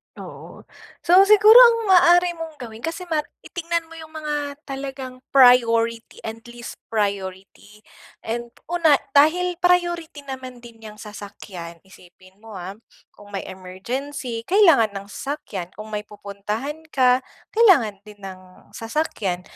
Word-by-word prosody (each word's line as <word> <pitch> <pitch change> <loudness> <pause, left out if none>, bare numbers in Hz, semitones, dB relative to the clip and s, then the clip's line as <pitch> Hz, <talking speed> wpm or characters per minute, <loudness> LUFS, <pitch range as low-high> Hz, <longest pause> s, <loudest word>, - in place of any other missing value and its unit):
Oo. - - -11 0.4
So, 370 +3 +6
siguro 425 +3 +8
ang 475 -2 +8
maaari 350 -1 +5
mong 325 -1 -7
gawin 235 -6 -10
kasi 325 +8 -5
ma 315 - +1 0.2
titignan 335 -1 -3
mo 330 - -11
yung 315 0 -12
mga 295 -2 -4
talagang 270 -2 -7 0.2
priority 230 -3 +4
and 225 0 -6
least 240 0 -10
priority. 200 0 -4 0.4
And, 235 +1 -4 0.2
una, 335 -4 +4 0.2
dahil 335 +5 +3
priority 345 -4 0
naman 260 -3 -9
din 235 -1 -14
'yang 210 0 -11
sasakyan, 195 -5 -10
isipin 185 0 -20
mo, 220 0 -13
ha, 190 +2 -8 0.3
kung 205 0 -16
may 195 - -3
emergency, 230 +7 -6
kailangan 330 - +4
ng 195 0 -7
sasakyan. 200 - -6
Kung 215 +1 -10
may 210 0 -5
pupuntahan 210 +8 -6 0.2
ka, 255 -1 +4 0.3
kailangan 330 - +4
din 205 -1 -15
ng 185 -1 -12
sasakyan. 225 - -3
245 Hz, 130 wpm, -22 LUFS, 205-320 Hz, 0.4 s, siguro